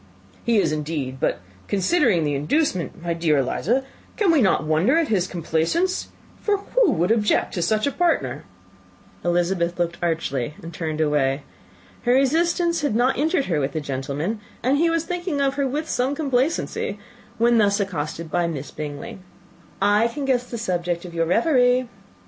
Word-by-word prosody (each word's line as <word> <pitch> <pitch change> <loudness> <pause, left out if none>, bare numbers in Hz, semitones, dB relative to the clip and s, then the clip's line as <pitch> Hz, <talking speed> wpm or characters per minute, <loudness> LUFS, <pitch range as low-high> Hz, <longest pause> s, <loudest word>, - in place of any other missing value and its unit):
"He 235 -1 +2
is, 165 -6 +2
indeed: 150 -4 -3
but - - 0 0.3
considering 200 - +2
the 145 -1 0
inducement, 170 - -1
my 170 -1 -1
dear 165 -2 +1
Miss 135 - +2
Eliza, 240 - 0 0.4
we 360 -6 +4
cannot 210 - +3
wonder 160 - +3
at 330 -3 +1
his 190 -4 +1
complaisance; 175 - 0 0.3
for 415 -1 +1
who 450 +2 +2
would 175 +5 +1
object 215 -2 +2
to 175 - -2
such 215 +4 +1
a 280 - +1
partner?" 345 +2 0 0.8
Elizabeth 175 0 0
looked 170 -1 -1
archly, 150 -6 -1
and 165 +1 -8
turned 160 -1 -3
away. 145 -2 +1 0.6
Her 245 - +2
resistance 335 +5 +2
had 290 -7 0
not 250 +3 +2
injured 305 -1 +1
her 165 -5 0
with 140 0 -1
the 155 - -1
gentleman, 145 +8 -3 0.2
and 270 +4 +2
he 335 +1 +3
was 330 -1 +1
thinking 350 -4 -3
of 275 -1 +2
her 280 -1 0
with 300 +4 -3
some 260 +3 0
complacency, 280 +1 -1 0.4
when 235 0 +4
thus 200 -1 +3
accosted 165 -4 -3
by 175 -1 +1
Miss 145 -4 -5
Bingley, 150 +3 -6 0.6
"I 205 +3 +4
can 275 +4 -4
guess 250 -2 0
the 235 - -4
subject 175 -5 -2
of 175 - -9
your 165 -1 0
reverie." 250 - +3
200 Hz, 170 wpm, -23 LUFS, -, 0.8 s, we